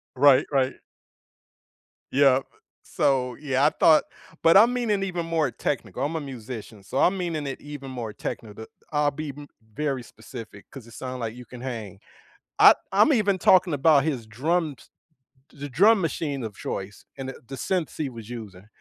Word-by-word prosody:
Right, 140 +1 +6
right. 135 -2 +1 1.4
Yep. 135 -1 +4 0.4
So, 125 -3 0
yeah, 135 -2 +1
I - - +6
thought 155 -1 +5 0.4
but 165 +2 +6
I'm 235 +4 +6
meaning 215 -5 0
even 175 -3 -3
more 160 -4 +1
technical, 135 -1 -3
I'm 155 +3 -2
a 160 - -2
musician, 115 -5 -8
so, 130 +7 -3
I'm 190 +2 +3
meaning 165 -5 -3
it 135 - -5
even 145 -2 -8
more 115 -4 -5
technical. 110 0 -6 0.3
I'll 150 -1 +2
be 155 +1 -6
m 145 -1 -10 0.3
very 140 -3 -2
specific 110 -2 -11
'cause 130 -5 -11
it 115 - -14
sound 130 -1 -6
like 115 0 -4
you 125 -1 -11
can 125 +2 -11
hang. 110 -7 -6 0.6
I - - +10 0.2
I'm 210 +10 +5
even 205 -5 +2
talking 185 -3 +4
about 145 0 +4
his 135 -8 -2
drums 150 +5 -2 0.6
the 145 0 -7
drum 200 - +5
machine 145 -5 -2
of 110 -3 -6
choice 95 +1 -6
and 135 0 -5
the - - -7
the 135 - -6
synths 180 +3 -2
he 145 -3 -2
was 115 -2 -10
using. 105 -5 -9
135 Hz, 170 wpm, -25 LUFS, 120-160 Hz, 1.4 s, I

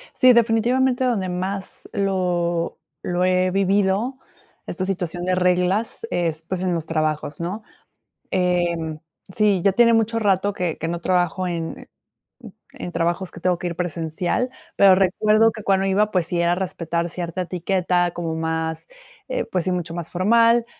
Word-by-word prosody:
Sí, 255 -1 +6
definitivamente, 245 +3 +2
donde 220 -7 0
más 190 +2 -4
lo 180 -3 0 0.3
lo 180 +1 0
he 185 0 +2
vivido, 195 +6 +1 0.5
esta 185 - -3
situación 175 -2 -3
de 185 - +1
reglas 180 +5 +1
es, 165 -2 -1
pues, 185 +2 -3
en 185 -1 0
los 165 -2 -3
trabajos, 155 -2 -2
¿no? 190 +6 -4 0.7
Em, 175 -4 0 0.3
sí, 210 -3 +3
ya 195 - +4
tiene 235 +3 +5
mucho 225 0 +2
rato, 200 -1 +1
que 180 -4 -2
que 165 - -3
no 170 0 -3
trabajo 180 +1 0
en 170 -2 -5 0.9
en - - -6
trabajos 175 +2 -1
que - - -11
tengo 180 0 +1
que 175 - -3
ir 170 - -6
presencial. 175 +7 -1 0.3
Pero, 195 -1 +7
recuerdo 215 +4 +3
que 215 -2 -9
cuando 195 -1 +2
iba, 210 +2 +2
pues, 180 -4 +1
sí 175 0 -1
era 170 0 +3
respetar 170 -2 -2
cierta 175 +1 -4
etiqueta 180 0 0
como 165 -2 -3
más, 160 0 -3 0.4
eh, - - -1
pues, 180 -3 -2
sí 185 - 0
mucho 175 -2 -3
más 170 -1 -5
formal. 230 +5 +3
180 Hz, 160 wpm, -22 LUFS, 170-200 Hz, 0.9 s, Pero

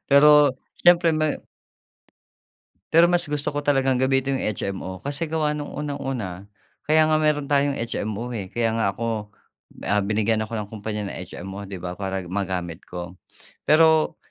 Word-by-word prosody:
Pero 145 -1 +6 0.2
siyempre 175 -1 +5
may 155 -1 -1 1.5
pero 165 +1 +7
mas 175 0 +2
gusto 145 -1 -2
ko 145 - -1
talagang 135 -3 +2
gamitin 135 0 +1
yung - - -2
HMO. 95 -1 -4
Kasi 145 +3 -2
gawa 155 -2 0
nung 145 -1 -5
unang-una, 130 -10 -4 0.4
kaya 155 0 +5
nga 155 0 +3
meron 150 -2 +1
tayong 140 -1 +2
HMO, 115 +1 -3
eh. 100 -4 -5
Kaya 115 -1 0
nga 100 -3 +1
ako, 110 -3 -3 0.6
ah, 105 0 +2
binigyan 110 +2 +1
ako 110 +1 -4
ng 105 -1 -4
kumpanya 105 -1 -4
ng - - -7
HMO, 95 +2 -7
'di 95 - -6
ba, 90 0 -4
para 95 -1 -3
magamit 90 -2 -3
ko. 90 0 -6 0.5
Pero 160 0 +4
125 Hz, 155 wpm, -23 LUFS, 100-150 Hz, 1.5 s, pero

